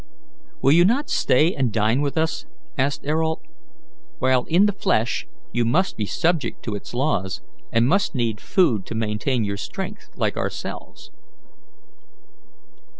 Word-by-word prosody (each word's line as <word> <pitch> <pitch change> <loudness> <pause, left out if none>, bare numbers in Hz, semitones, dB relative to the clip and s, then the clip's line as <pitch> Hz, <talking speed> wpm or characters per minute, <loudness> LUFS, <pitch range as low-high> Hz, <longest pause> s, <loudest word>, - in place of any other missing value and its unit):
"Will 135 - +6
you 170 +3 +7
not 245 +10 +2
stay 155 +8 +3
and 130 -4 0
dine 110 +4 +2
with 145 +1 -1
us?" 160 0 -1 0.3
asked 140 +2 -1
Ayrault. 160 +2 0 0.7
"While 130 - +2
in 175 +5 +4
the 205 - +2
flesh 125 - 0 0.2
you 120 - +1
must 165 +12 +1
be 105 - -2
subject 170 - 0
to 110 - -3
its 100 +3 -7
laws, 95 - -1 0.3
and 115 +1 +3
must 195 +2 +2
need 115 -4 -1
food 120 - +2
to - - -5
maintain 110 +3 0
your 100 -1 -2
strength, - - -6
like - - -1
ourselves." - - -5
130 Hz, 145 wpm, -23 LUFS, 110-160 Hz, 0.7 s, you